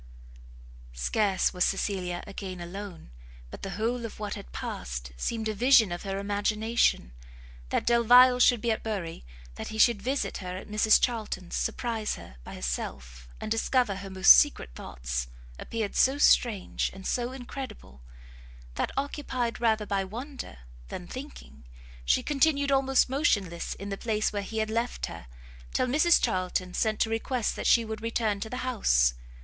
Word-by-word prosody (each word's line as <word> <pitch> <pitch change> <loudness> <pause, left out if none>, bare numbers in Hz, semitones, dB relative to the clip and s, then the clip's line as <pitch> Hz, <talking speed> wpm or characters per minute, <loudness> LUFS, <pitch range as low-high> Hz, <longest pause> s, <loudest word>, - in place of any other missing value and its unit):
Scarce 190 - +1
was 180 -1 +1
Cecilia 185 -3 -1
again 195 -2 -7
alone, 175 - -8 0.4
but - - -9
the 195 - -5
whole 235 +3 -1
of 230 - -7
what 210 -1 -4
had - - -9
passed - - -5
seemed 220 - -2
a 215 - -1
vision 230 -2 +5
of 175 - -4
her 195 -1 -4
imagination. 205 - 0 0.6
That - - 0
Delvile 245 +2 +6
should 245 -2 +5
be 235 - +1
at 220 - -1
Bury, 190 - -4 0.3
that - - -5
he 220 - -6
should 220 -2 +4
visit 265 +5 -2
her 180 -1 -6
at - - -9
Mrs 215 +1 +4
Charlton's, 215 -7 -2
surprise 225 -3 -2
her 60 - -12
by - - -9
herself, 60 0 -5
and 215 - -6
discover 225 -2 +1
her 195 0 -7
most 190 0 +8
secret 290 - +2
thoughts, - - -4 0.3
appeared 220 -3 -4
so 265 +2 +4
strange 230 -8 +3
and 190 0 -11
so 245 0 -1
incredible, 255 - -8 0.7
that, - - -1
occupied 265 -4 -2
rather 220 -2 +2
by 200 -1 0
wonder 235 - -8 0.3
than, 180 - -7
thinking, 215 - -10 0.4
she - - +2
continued 285 -1 +2
almost 270 -1 +3
motionless 205 - 0
in 200 +1 -7
the 195 - -3
place 215 -2 0
where 205 - -1
he 220 +3 -6
had 220 0 0
left 230 +2 -1
her, 85 -7 -9 0.5
till - - +2
Mrs 305 +7 +4
Charlton 185 0 -1
sent 215 +1 0
to 220 - +2
request 225 +1 -1
that - - -2
she 235 -1 +5
would 220 -1 -6
return 225 -2 -1
to 220 - -5
the 250 - -5
house. 60 - +3
215 Hz, 165 wpm, -28 LUFS, 185-240 Hz, 0.7 s, most